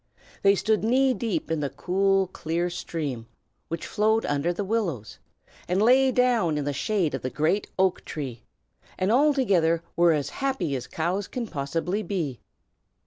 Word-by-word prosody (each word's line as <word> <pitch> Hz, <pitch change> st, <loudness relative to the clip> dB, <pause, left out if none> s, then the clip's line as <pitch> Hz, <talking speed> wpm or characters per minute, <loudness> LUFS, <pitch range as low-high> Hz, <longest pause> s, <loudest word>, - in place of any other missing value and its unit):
They 200 Hz, 0 st, +5 dB
stood 215 Hz, +1 st, +1 dB
knee 260 Hz, +3 st, +3 dB
deep 200 Hz, -11 st, -2 dB
in 160 Hz, -, 0 dB
the 145 Hz, -2 st, -1 dB
cool, 195 Hz, +3 st, +1 dB
clear 175 Hz, -1 st, -2 dB
stream 140 Hz, -9 st, -4 dB, 0.4 s
which 165 Hz, -, -4 dB
flowed 220 Hz, +2 st, +1 dB
under 145 Hz, +4 st, 0 dB
the 180 Hz, +4 st, -3 dB
willows, 190 Hz, -, -2 dB, 0.5 s
and 180 Hz, +2 st, +1 dB
lay 260 Hz, +4 st, +5 dB
down 235 Hz, -11 st, +2 dB
in 145 Hz, -, -2 dB
the 145 Hz, -, -1 dB
shade 185 Hz, 0 st, 0 dB
of -, -, -3 dB
the 130 Hz, -, -2 dB
great 160 Hz, +9 st, 0 dB
oak 190 Hz, -1 st, +2 dB
tree, 130 Hz, -7 st, -6 dB, 0.6 s
and 185 Hz, +3 st, +1 dB
altogether 225 Hz, -, +3 dB
were 170 Hz, -1 st, +5 dB
as 145 Hz, -2 st, -2 dB
happy 265 Hz, -, -1 dB
as 130 Hz, -1 st, -5 dB
cows 175 Hz, +8 st, -2 dB
can 245 Hz, -2 st, -4 dB
possibly 165 Hz, +4 st, -2 dB
be. 165 Hz, -, -3 dB
180 Hz, 160 wpm, -26 LUFS, 155-215 Hz, 0.6 s, They